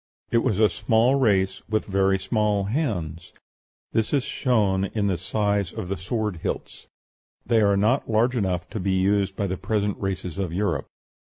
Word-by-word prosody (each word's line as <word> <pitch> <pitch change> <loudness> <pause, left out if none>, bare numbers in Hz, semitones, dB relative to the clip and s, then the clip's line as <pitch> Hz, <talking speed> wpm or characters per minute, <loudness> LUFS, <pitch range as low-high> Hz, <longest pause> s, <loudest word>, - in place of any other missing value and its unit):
It 115 - +4
was 105 -4 0
a 110 0 +5
small 110 +4 +2
race, 100 -8 +2
with 110 0 0
very 95 0 +2
small 105 +1 0
hands; 95 - -3 0.6
this 110 +4 0
is 140 -3 +2
shown 100 -9 +1
in 105 +1 -2
the 95 -2 +1
size 100 0 0
of 90 - -6
the 100 - -1
sword 105 +2 -3
hilts: - - -5 0.6
they 115 -2 +3
are 100 -1 +3
not 115 +7 +1
large 115 +3 +2
enough 90 -5 -1
to 110 - -4
be 95 0 0
used 95 +1 +1
by 100 - -1
the 95 -1 -2
present 105 -1 -1
races 95 -3 -4
of 95 -4 -2
Europe. 100 +4 -1
100 Hz, 175 wpm, -24 LUFS, 95-110 Hz, 0.6 s, a